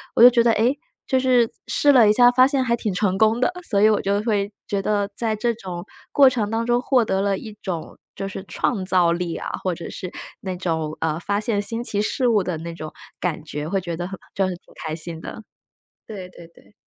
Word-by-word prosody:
我 - - +3
就 245 - +12
觉 240 -1 +3
得， 235 - +4
诶， 240 +7 +2 0.3
就 260 - +2
是 250 -3 +3 0.2
试 290 - +4
了 235 -6 +6
一 - - +5
下 245 +2 +6
发 255 +1 +5
现 275 -1 +1
还 235 -2 0
挺 210 -4 -2
成 190 0 0
功 220 +3 +3
的， 255 - +3 0.2
所 200 -3 +2
以 215 - +6
我 215 - +2
就 200 +1 0
会 205 -3 0 0.2
觉 200 -1 -1
得 205 0 0
在 225 -2 0
这 235 +2 0
种 180 -5 -7 0.3
过 275 -2 +7
程 220 -5 -1
当 225 +1 -1
中 240 0 +2
获 255 -3 +3
得 190 -2 0
了 200 -1 +1
一 215 -2 -9
种， 175 -5 -5 0.2
就 195 - -4
是 190 0 -7
创 200 -1 -1
造 180 -2 +3
力 170 -1 -2
啊， - - -5
或 185 -2 -1
者 165 - -8
是 185 - -6 0.3
那 185 -2 -4
种， 160 -4 -2
啊， 160 0 0
发 200 +3 -1
现 210 -2 0
新 230 +3 -2
奇 205 -3 0
事 245 +4 +1
物 215 -3 +3
的 180 -2 -3
那 170 +1 -6
种 155 -2 -8 0.3
感 160 -4 -2
觉， 150 -1 -5
会 195 +3 -1
觉 170 -2 -5
得 175 +1 -3
很 195 0 -7 0.2
就 195 - +1
会 - - -2
挺 - - -20
开 155 0 -2
心 165 0 -5
的。 220 +6 -8 0.6
对 190 -4 -8
对 170 -2 -14
对。 170 - -23
200 Hz, 260 characters per minute, -22 LUFS, 180-230 Hz, 0.6 s, 就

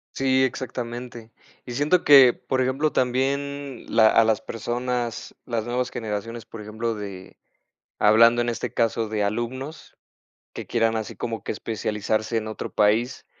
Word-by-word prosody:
Sí, 130 0 +2
exactamente, 120 -3 -5 0.3
y 125 - -7
siento 150 +8 +2
que, 135 -4 +8
por 130 -1 -2
ejemplo, 135 +4 +1
también 140 +2 -1
la 110 -1 +5
a 115 - +5
las 110 -2 +1
personas, 120 +1 -3
las 115 -3 -2
nuevas 125 +1 -1
generaciones, 115 +1 -5
por 115 -1 -10
ejemplo, 110 +2 -3
de 100 -3 -8 0.6
hablando, 115 +3 +6
en 120 - 0
este 115 - -4
caso, 115 -1 0
de 105 -1 -1
alumnos 125 +8 -4 0.6
que - - -7
quieran 115 -1 +1
así 110 - -5
como 115 -2 -4
que - - -4
especializarse 110 +1 -2
en 110 -1 -1
otro 110 - -5
país, 110 +5 +1
120 Hz, 150 wpm, -24 LUFS, 110-130 Hz, 0.6 s, que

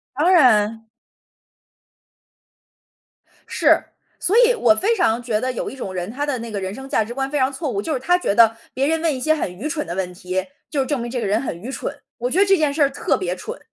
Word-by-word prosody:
当 320 +7 +3
然。 225 - +4 2.6
是。 - - +3 0.4
所 410 +6 +2
以 - - +3
我 240 - +4
非 430 - +1
常 235 - +1
觉 220 -3 -1
得 255 - -1
有 250 - -4
一 - - -9
种 195 -8 -6
人 180 +1 -4
他 285 +5 -3
的 280 -4 -2
那 230 0 -6
个 200 -2 -4
人 190 +1 -4
生 265 +3 -9
价 220 - +1
值 225 +3 -7
观 270 +1 -2
非 295 - -2
常 260 0 +2
错 280 +1 -4
误， 200 -4 -2
就 315 - -3
是 260 - -1
他 355 +7 +2
觉 355 - -1
得 225 0 +5 0.2
别 270 +2 0
人 320 0 0
问 325 -2 +1
一 260 - -4
些 315 +4 +2
很 240 - -3
愚 215 +12 -5
蠢 300 -1 -3
的 170 - -5
问 180 -1 -3
题， 185 +1 -3 0.2
就 290 - -2
是 265 - +1
证 285 +1 -1
明 240 0 -5
这 250 - -2
个 - - -2
人 210 +3 +1
很 175 -10 -5
愚 245 - -7
蠢。 - - -4 0.3
我 245 +2 -2
觉 365 - +2
得 400 - +6
这 390 - +5
件 300 -5 +1
事 300 - -2
儿 280 - +5
特 275 - 0
别 180 -2 -2
蠢。 465 - -7
255 Hz, 275 characters per minute, -21 LUFS, 215-300 Hz, 2.6 s, 得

